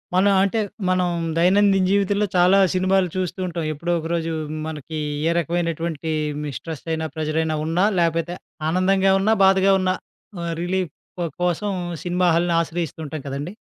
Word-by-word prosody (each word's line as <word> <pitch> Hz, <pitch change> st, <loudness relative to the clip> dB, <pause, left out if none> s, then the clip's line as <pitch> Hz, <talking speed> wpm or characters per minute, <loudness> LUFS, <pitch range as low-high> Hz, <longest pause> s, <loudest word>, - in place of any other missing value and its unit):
మన 190 Hz, +2 st, +4 dB, 0.2 s
అంటే, 200 Hz, +3 st, 0 dB, 0.3 s
మనం 185 Hz, -1 st, +2 dB, 0.3 s
దైనందిన 195 Hz, +2 st, +4 dB
జీవితంలో 200 Hz, +1 st, +2 dB
చాలా 180 Hz, +2 st, +5 dB
సినిమాలు 185 Hz, 0 st, +2 dB
చూస్తూ 185 Hz, 0 st, -2 dB
ఉంటాం. 170 Hz, -2 st, -3 dB
ఎప్పుడో 170 Hz, +4 st, -3 dB
ఒకరోజు 165 Hz, 0 st, -2 dB, 0.4 s
మనకి 155 Hz, 0 st, -6 dB, 0.3 s
ఏ -, -, +3 dB
రకమైనటువంటే 165 Hz, -1 st, -2 dB, 0.3 s
మి 150 Hz, -, -4 dB
స్ట్రెస్ 160 Hz, -3 st, -7 dB
అయినా 160 Hz, 0 st, -1 dB
ప్రెజరైనా 155 Hz, 0 st, -1 dB
ఉన్నా, 165 Hz, +4 st, +1 dB, 0.2 s
లేపోతే 165 Hz, +1 st, 0 dB, 0.3 s
ఆనందంగా 190 Hz, +2 st, +3 dB
ఉన్నా, 215 Hz, +3 st, +3 dB
బాధగా 190 Hz, 0 st, +5 dB
ఉన్నా, 185 Hz, 0 st, +1 dB, 0.5 s
ఆహ్, 170 Hz, -1 st, -3 dB
రిలీఫ్ 180 Hz, -2 st, -1 dB, 0.5 s
కోసం 180 Hz, +4 st, 0 dB, 0.3 s
సినిమా 180 Hz, +1 st, +1 dB
హాల్‌ని 170 Hz, +1 st, +2 dB
ఆశ్రయిస్తూ 165 Hz, -2 st, -4 dB
ఉంటాం 155 Hz, 0 st, -6 dB
కదండి! 140 Hz, +6 st, -4 dB
175 Hz, 140 wpm, -22 LUFS, 160-190 Hz, 0.5 s, చాలా